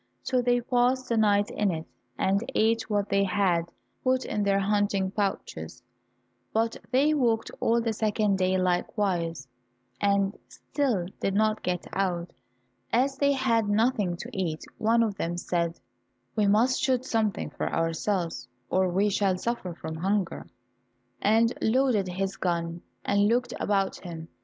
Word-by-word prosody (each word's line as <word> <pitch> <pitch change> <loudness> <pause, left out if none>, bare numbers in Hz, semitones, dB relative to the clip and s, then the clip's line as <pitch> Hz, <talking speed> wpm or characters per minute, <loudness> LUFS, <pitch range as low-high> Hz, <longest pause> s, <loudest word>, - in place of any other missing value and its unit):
So 255 -1 +1
they 245 0 +2
passed 250 +2 +1
the 235 - +2
night 205 -1 +3
in 210 -1 +1
it, 160 -2 -3 0.3
and 195 +3 +1
ate 225 +1 +2
what 205 -1 0
they 200 0 +3
had 185 -4 +1 0.3
put 255 0 +1
in 210 - -2
their 200 -1 +2
hunting 200 -1 +1
pouches, 200 -1 -3 0.7
but 225 +1 +1
they 275 +5 +3
walked 235 -6 +1
all 230 +1 +2
the 230 -1 -1
second 210 -2 +1
day 185 0 +2
likewise, 175 - -1 0.5
and 200 0 +2
still 250 -12 -1
did 195 - -1
not 215 +1 +2
get 180 -1 -2
out. 180 -3 -1 0.6
As 265 +4 +2
they 280 0 +4
had 230 -5 +1
nothing 205 -4 +1
to - - -7
eat, 170 -5 -2
one 230 +2 +3
of 220 -3 0
them 175 -3 -2
said, 170 -1 -1 0.6
"We 210 -2 +2
must 230 +7 +3
shoot 260 -3 +1
something 220 -4 -1
for - - -3
ourselves 165 -4 -1 0.2
or 185 0 +3
we 195 +4 +2
shall 195 -2 +1
suffer 185 -4 -3
from 160 -1 -6
hunger," 195 +2 -1 0.7
and 225 +3 +3
loaded 230 -4 +2
his 190 +2 -3
gun, 170 -1 -2 0.2
and 200 0 +3
looked 245 +2 +1
about 195 -2 0
him. 165 -3 -8
205 Hz, 150 wpm, -27 LUFS, 185-230 Hz, 0.7 s, they